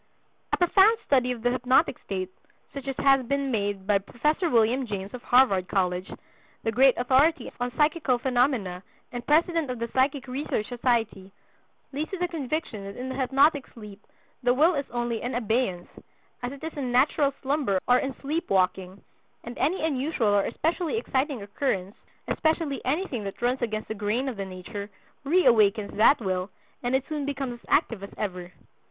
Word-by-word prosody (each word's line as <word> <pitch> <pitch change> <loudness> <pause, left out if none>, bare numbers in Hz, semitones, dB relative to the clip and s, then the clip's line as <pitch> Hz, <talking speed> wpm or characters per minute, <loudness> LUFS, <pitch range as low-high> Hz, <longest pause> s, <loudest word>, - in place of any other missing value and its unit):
A - - +2
profound 390 +5 +5
study 255 -3 +2
of 235 -2 -6
the 245 - +2
hypnotic 255 +3 +2
state, 185 -1 -4 0.4
such 275 -1 -7
as 270 - -2
has 270 -1 +4
been 280 0 0
made 200 -3 -2
by 200 0 +3
Prof. 275 - -1
William 240 +3 +2
James, 200 -2 -5
of 250 - -7
Harvard 225 -9 +4
College, 180 -1 -1 0.5
the 225 - 0
great 260 +3 +5
authority 270 +7 +2
on 245 0 -2
psychical 300 -4 +2
phenomena 245 -8 0 0.3
and 245 -1 -5
president 330 0 +2
of 250 - -3
the 235 0 -4
Psychic 270 +2 0
Research 255 -4 -2
Society, 230 -6 -1 0.6
leads 300 +3 -3
to 385 - -4
the 355 0 0
conviction 310 - -4
that 200 0 -8
in 255 +1 -5
the 260 - -4
hypnotic 275 +2 +3
sleep 210 -3 -11 0.4
the 245 0 +2
will 320 +6 +4
is 280 -3 -2
only 240 -1 -2
in 245 +1 -3
abeyance, 220 -6 -1 0.5
as 245 0 -3
it 280 +2 -11
is 320 - -4
in 265 -4 -3
natural 275 +3 +3
slumber 270 -8 +1
or 250 0 +5
in 270 -1 -3
sleepwalking, 195 - -1 0.4
and 240 +1 -7
any 325 +1 +1
unusual 275 -5 0
or 205 -1 +3
especially 330 - -1
exciting 270 - -1
occurrence, 200 -3 -2 0.3
especially 315 -3 0
anything 270 - -1
that 195 -1 -6
runs 250 +2 0
against 215 -2 -2
the - - -3
grain 215 +5 -1
of 260 - -3
the 195 - -3
nature, 200 +2 -7 0.3
reawakens 225 - +3
that 225 +7 +5
will, 185 -3 -2 0.3
and 245 +1 0
it 265 - +1
soon 300 -2 -3
becomes 275 -3 -3
as - - -23
active 230 -5 +2
as 200 - -7
ever. 180 -3 -4
250 Hz, 175 wpm, -26 LUFS, 210-280 Hz, 0.6 s, profound